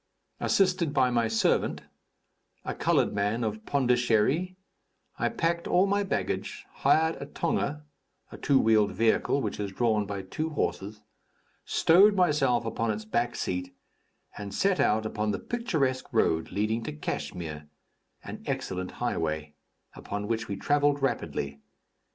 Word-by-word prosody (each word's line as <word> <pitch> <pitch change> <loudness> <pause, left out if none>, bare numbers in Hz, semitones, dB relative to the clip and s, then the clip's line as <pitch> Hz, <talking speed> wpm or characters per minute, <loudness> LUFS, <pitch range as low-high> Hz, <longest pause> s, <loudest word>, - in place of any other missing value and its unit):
Assisted 180 -6 +2
by 130 -2 +3
my 120 -1 +2
servant, 110 0 +1 0.8
a - - -2
colored - - +1
man 105 +4 0
of 110 0 -4
Pondichery, 125 +6 +2 0.6
I - - +1
packed 170 -6 -1
all 185 +2 +4
my 200 +1 +1
baggage, 200 - -3
hired 160 +1 +2
a 140 - -5
tonga 150 0 -2 0.5
(a - - -9
two 140 -2 +3
wheeled 110 -2 +3
vehicle 115 +5 +2
which - - -3
is 100 -1 -3
drawn 110 -1 +1
by 100 -1 -4
two 155 +12 -3
horses), 105 -8 -3 0.6
stowed 195 +5 +5
myself 145 - +2
upon 115 0 -1
its 110 0 -3
back 120 +2 -1
seat, 90 0 -3 0.6
and 100 -1 -6
set 195 -1 +2
out 110 +1 +2
upon 105 0 -2
the 105 - 0
picturesque 155 - -1
road 80 0 +1
leading 110 +3 0
to - - -4
Kachmyr, 75 0 -5 0.6
an - - -8
excellent 90 0 -3
highway, 80 -9 -2 0.4
upon 105 0 -5
which 115 0 -2
we 100 - -3
travelled 145 +5 +1
rapidly. 70 - -2
115 Hz, 140 wpm, -28 LUFS, 105-150 Hz, 0.8 s, stowed